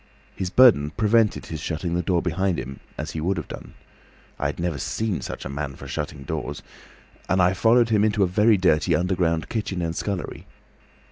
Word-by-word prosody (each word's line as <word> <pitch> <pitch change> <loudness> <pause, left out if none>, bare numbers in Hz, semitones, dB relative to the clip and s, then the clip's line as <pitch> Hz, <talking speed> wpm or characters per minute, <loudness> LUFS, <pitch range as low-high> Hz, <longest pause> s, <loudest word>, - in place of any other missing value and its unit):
His 95 - -3
burden 95 - +6
prevented 110 0 +2
his 80 - -6
shutting 85 +2 -3
the 90 - +1
door 90 0 0
behind 90 +1 0
him—as 70 +3 -7
he 80 - -4
would 95 +4 0
have 85 - -4
done; - - -10 0.6
I - - 0
never 85 -4 -2
saw 110 +5 -2
such - - -6
a - - -2
man 70 0 -4
for - - -10
shutting 70 -2 -5
doors—and 95 +6 -6
I 90 0 +4
followed 115 +4 +4
him 105 -2 +3
into 105 -1 +2
a - - +3
very 105 +4 +4
dirty 90 -5 +3
underground 85 -3 0
kitchen 100 -5 -3
and 85 0 -2
scullery. 100 -1 -4
90 Hz, 180 wpm, -24 LUFS, 80-105 Hz, 0.6 s, burden